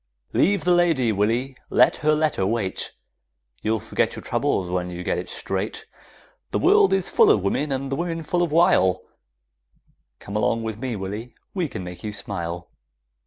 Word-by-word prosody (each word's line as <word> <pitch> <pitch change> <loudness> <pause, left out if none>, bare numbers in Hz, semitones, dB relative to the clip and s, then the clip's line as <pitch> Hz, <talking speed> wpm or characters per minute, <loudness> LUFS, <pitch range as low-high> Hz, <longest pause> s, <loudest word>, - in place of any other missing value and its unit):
Leave 200 +1 +3
the 180 - +4
lady, 165 -9 +3
Willy, 115 +6 0
let - - +4
her 155 0 +2
letter 155 -9 +1
wait, 105 -3 -1 0.7
You'll 110 +1 0
forget - - -1
your - - -8
troubles 95 - 0
when 90 0 -2
you 90 0 -6
get - - 0
it - - -6
straight, 95 +3 -3 0.6
The - - -1
world 415 0 +5
is 195 -2 +1
full - - +5
of 100 - +4
women, 140 +9 0
and 135 0 -2
the - - +1
women 165 +1 -3
full 175 +3 0
of 170 -3 0
wile; 120 - +4 1.1
Come 100 - -8
along 110 +2 +1
with 110 -1 -4
me, 125 -2 -3
Willy, 105 +5 -6 0.2
we 180 -4 -1
can 95 - -6
make 90 0 -8
you 105 -1 -4
smile! 85 -4 -4
115 Hz, 175 wpm, -23 LUFS, 95-155 Hz, 1.1 s, world